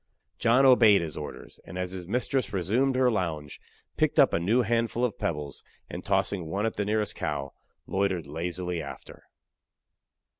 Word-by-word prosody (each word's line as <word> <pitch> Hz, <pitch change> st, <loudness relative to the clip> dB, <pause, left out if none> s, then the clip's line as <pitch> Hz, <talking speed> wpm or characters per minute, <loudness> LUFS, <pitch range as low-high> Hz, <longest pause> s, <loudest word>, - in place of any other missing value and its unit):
John 120 Hz, +4 st, +4 dB
obeyed 115 Hz, -8 st, +6 dB
his 80 Hz, -2 st, -6 dB
orders; 75 Hz, -, -8 dB
and, 90 Hz, -, -9 dB
as 90 Hz, 0 st, -3 dB
his 90 Hz, -2 st, -7 dB
mistress 125 Hz, +3 st, -1 dB
resumed 110 Hz, +8 st, +1 dB
her 130 Hz, -1 st, +3 dB
lounge, 80 Hz, -8 st, -3 dB, 0.4 s
picked -, -, +1 dB
up -, -, +6 dB
a -, -, +2 dB
new 110 Hz, +9 st, +2 dB
handful 115 Hz, +2 st, 0 dB
of 115 Hz, -, -4 dB
pebbles, 75 Hz, -4 st, -3 dB, 0.3 s
and -, -, -6 dB
tossing 90 Hz, -5 st, 0 dB
one 100 Hz, +6 st, -1 dB
at 115 Hz, -, -1 dB
the 100 Hz, -, -1 dB
nearest 105 Hz, 0 st, 0 dB
cow, 70 Hz, 0 st, -4 dB, 0.3 s
loitered 95 Hz, -4 st, -1 dB
lazily 85 Hz, +3 st, -3 dB
after. 70 Hz, -, -10 dB
100 Hz, 160 wpm, -27 LUFS, 85-115 Hz, 0.4 s, obeyed